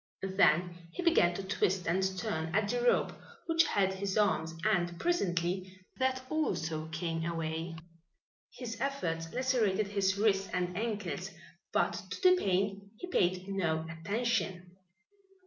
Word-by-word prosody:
Then 175 -1 +3
he 360 - -4
began 175 - +4
to 195 - -4
twist 190 -1 0
and 175 +3 +1 0.2
turn 160 -1 -2
at 210 -1 +3
the 245 0 0
rope 245 - +3 0.3
which 330 0 +4
held 190 - +2
his 190 +1 -2
arms 165 -6 +2
and 175 -5 +1
presently 185 - 0 0.3
that 260 0 +1
also 160 - -1
came 165 +1 -3
away. 165 0 -3 0.8
His 240 -2 -7
efforts 165 -13 -2
lacerated 230 -6 +1
his 195 -1 +1
wrists 195 -2 +2
and 180 0 -1
ankles, 195 -5 -3 0.4
but 220 +2 +2
to 185 -1 -6
the 365 0 +8
pain 200 - 0
he - - -6
paid 185 - +1
no 165 -5 0
attention. 185 0 -2
190 Hz, 135 wpm, -32 LUFS, 170-220 Hz, 0.8 s, the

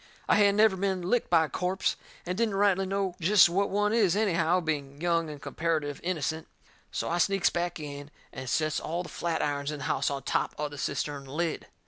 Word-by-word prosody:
I - - +4
hadn't 200 -1 +4
never 215 -1 +5
been 190 -1 -1
licked 225 +7 0
by 165 -2 +5
a - - -9
corpse, 185 +1 -1 0.3
and 180 +1 -2
didn't 220 -1 0
rightly 195 -1 +2
know 195 -1 -1
jest 185 +1 +6
what 195 +3 +1
one 205 +1 +1
is, 205 -6 +3
anyhow, 180 -4 +2
being 145 -4 -3
young 165 -1 +1
and 150 -1 -8
comparitive 155 -1 -2
innocent. 160 -2 -2 0.4
So - - -2
I 175 - 0
sneaks 195 +2 +2
back 175 -1 -2
in 145 -1 -7 0.2
and 130 -1 -6
sets 155 +2 +1
all 170 +3 -3
the - - -9
flatirons 145 -4 -2
in 150 - -4
the 140 - -7
house - - 0
on 140 -2 -4
top - - -1
of 150 0 -3
the 145 - -8
cistern 140 0 -3
lid. 155 +4 -3
170 Hz, 205 wpm, -28 LUFS, 150-195 Hz, 0.4 s, jest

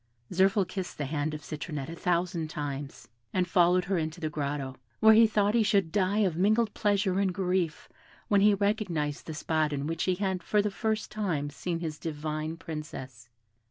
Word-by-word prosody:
Zirphil 190 +2 +3
kissed 190 -3 -5
the 145 - -2
hand 150 +2 -2
of 150 - -8
Citronette 150 -2 -5
a - - -6
thousand 175 -1 0
times, 145 -2 -5 0.3
and 180 -1 +1
followed 180 +1 +4
her 185 -1 0
into 160 +2 -3
her 155 - -1
grotto, 140 -3 -3 0.2
where 220 0 +8
he 225 +1 +7
thought 210 -1 +2
he 235 - +4
should 200 -6 +2
die 200 +2 +2
of 175 -4 0
mingled 210 +5 +2
pleasure 200 -2 +1
and 195 -2 +2
grief 180 -3 -1 0.4
when 200 -1 +4
he 205 0 +6
recognised 190 -8 -1
the 160 - -5
spot 155 -1 0
in 140 -1 -2
which 165 +1 -1
he 185 - +2
had 190 -1 -1
for 210 - +1
the 205 0 +1
first 220 +1 -2
time 165 -9 -2
seen 170 +3 -3
his 155 -3 -4
divine 155 0 -4
Princess. 135 -7 -8
175 Hz, 190 wpm, -29 LUFS, 155-200 Hz, 0.4 s, where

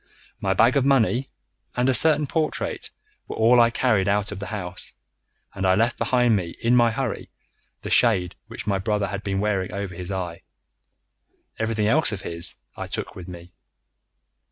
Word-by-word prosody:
My 95 0 0
bag 115 +7 +4
of 140 - +3
money 135 -1 +2 0.5
and 125 +1 +2
a 130 - +4
certain 150 +4 +5
portrait 155 +2 -2 0.4
were - - -6
all 115 +2 +5
I 115 - +5
carried 110 -5 +1
out 100 +1 +1
of 100 - -6
the 100 - -6
house, 95 -3 -5 0.6
and 95 - -5
I 95 0 +4
left 115 +4 +1
behind 125 -3 +3
me 90 -4 -3
in 120 +2 +2
my 120 -1 +5
hurry 120 0 -3 0.5
the - - -5
shade 95 -7 +4
which - - -8
my 100 -2 0
brother 105 0 -1
had 100 +1 -4
been 95 -1 -2
wearing 100 -3 -1
over 100 -2 -4
his 90 +2 -6
eye. 90 -3 -4 1.2
Everything 110 -1 0
else 145 +7 +3
of 100 -3 -5
his 85 0 -2 0.2
I - - -6
took - - -5
with 90 -1 -9
me. 90 0 -11
105 Hz, 180 wpm, -24 LUFS, 95-120 Hz, 1.2 s, certain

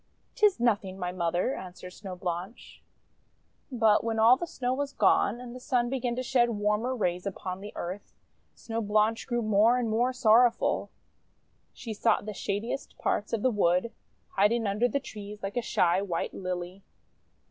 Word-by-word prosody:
Tis 420 - +3
nothing, 205 -5 0
my 180 -1 -3
Mother," 175 +6 0
answered 180 0 -9
Snow 190 -1 -8
Blanche. 180 +5 -6 0.9
But 225 -4 +3
when 225 -1 -1
all 225 +3 +7
the 345 +6 -5
Snow 250 -5 -2
was 280 +1 -3
gone, 210 +1 +3
and 250 -1 -9
the - - -7
Sun 250 -2 0
began 250 -2 -1
to 255 - -3
shed 240 -2 +2
warmer 210 +3 0
rays 180 -4 -1
upon 190 -1 -5
the 205 +1 -8
earth, 185 +4 -6 0.4
Snow 230 0 -4
Blanche 215 +1 +1
grew 240 -2 -1
more 215 +3 +4
and 235 -3 -1
more 240 +3 +2
sorrowful. 240 -1 +3 0.8
She 230 -3 -7
sought 205 - +1
the 215 - -5
shadiest 205 +7 -4
parts 205 - -1
of 225 -3 -1
the 255 - +3
wood, 185 +1 +1 0.4
hiding 220 +4 +2
under 210 +4 +1
the 280 - -1
trees 210 -5 -9
like 195 +1 -4
a 245 - +1
shy 180 -4 +2
white 180 -4 -3
Lily. 180 0 -5
215 Hz, 170 wpm, -28 LUFS, 195-240 Hz, 0.9 s, all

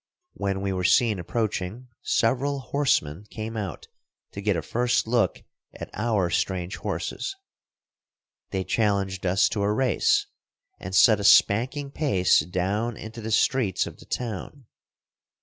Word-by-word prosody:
When 95 -1 -2
we 100 -1 -1
were 90 -1 -2
seen 110 +1 +3
approaching, 110 +4 -3
several 135 +4 +1
horsemen 105 - 0
came 110 +1 -6
out 100 -5 -5 0.4
to 100 - -7
get 105 -1 +1
a 80 - -2
first 120 +8 +1
look 115 +1 0 0.3
at - - -8
our 105 -5 0
strange 90 0 -1
horses. 390 - -4 1.1
They 95 -1 -2
challenged 100 -3 0
us 95 +3 +3
to 105 - -2
a 100 +1 +1
race, 125 +3 +2 0.5
and 95 +1 -5
set 110 +2 +6
a - - -4
spanking 125 +8 +4
pace 130 - +3
down 95 +8 -2
into 110 +1 -8
the 110 - -5
streets 110 -3 +2
of - - -9
the - - -14
town. 125 +3 -5
105 Hz, 140 wpm, -25 LUFS, 95-120 Hz, 1.1 s, set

